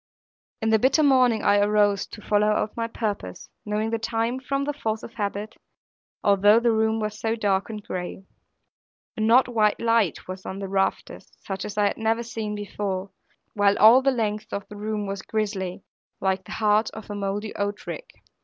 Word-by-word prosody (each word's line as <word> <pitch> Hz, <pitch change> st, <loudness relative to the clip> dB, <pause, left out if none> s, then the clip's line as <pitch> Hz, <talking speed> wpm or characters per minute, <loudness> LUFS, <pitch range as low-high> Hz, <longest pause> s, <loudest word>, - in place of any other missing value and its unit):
In 220 Hz, -, +2 dB
the 220 Hz, -, +5 dB
bitter 270 Hz, +6 st, +3 dB
morning 255 Hz, -6 st, +4 dB
I 205 Hz, 0 st, +4 dB
arose, 205 Hz, -1 st, +2 dB
to 210 Hz, -, -11 dB
follow 210 Hz, 0 st, +2 dB
out 210 Hz, 0 st, 0 dB
my 230 Hz, 0 st, -2 dB
purpose, 205 Hz, -, -4 dB, 0.2 s
knowing 215 Hz, +1 st, -1 dB
the 230 Hz, -, 0 dB
time 230 Hz, +2 st, -1 dB
from 275 Hz, +1 st, -2 dB
the 295 Hz, +1 st, -2 dB
force 220 Hz, -6 st, -3 dB
of 230 Hz, -, -9 dB
habit, 205 Hz, 0 st, -4 dB, 0.7 s
although 205 Hz, +2 st, +5 dB
the 235 Hz, 0 st, +2 dB
room 220 Hz, 0 st, +1 dB
was 215 Hz, 0 st, -3 dB
so 225 Hz, 0 st, 0 dB
dark 200 Hz, -3 st, 0 dB
and 215 Hz, -2 st, -6 dB
gray. 180 Hz, +1 st, -5 dB, 0.9 s
An 220 Hz, 0 st, 0 dB
odd 250 Hz, +3 st, +6 dB
white 215 Hz, -4 st, +2 dB
light 230 Hz, -6 st, +1 dB
was 185 Hz, +1 st, -7 dB
on 190 Hz, -, -6 dB
the 195 Hz, 0 st, -5 dB
rafters, 195 Hz, 0 st, -2 dB
such 190 Hz, -1 st, -4 dB
as 210 Hz, -, -7 dB
I 205 Hz, -1 st, +3 dB
never 225 Hz, +1 st, 0 dB
had -, -, -7 dB
seen 220 Hz, -2 st, -4 dB
before; 200 Hz, -2 st, -4 dB, 0.4 s
while 205 Hz, -1 st, +3 dB
all 230 Hz, +5 st, +8 dB
the 275 Hz, -, +3 dB
length 215 Hz, -4 st, -2 dB
of 200 Hz, -, -4 dB
the 210 Hz, -, -9 dB
room 210 Hz, 0 st, -3 dB
was 195 Hz, 0 st, -4 dB
grisly, 195 Hz, -4 st, -3 dB, 0.4 s
like 190 Hz, -1 st, 0 dB
the -, -, -8 dB
heart 215 Hz, 0 st, +2 dB
of 215 Hz, -1 st, -8 dB
a -, -, -3 dB
mouldy 205 Hz, +1 st, -3 dB
oat 205 Hz, 0 st, -3 dB
rick. -, -, -7 dB
210 Hz, 190 wpm, -25 LUFS, 200-225 Hz, 0.9 s, all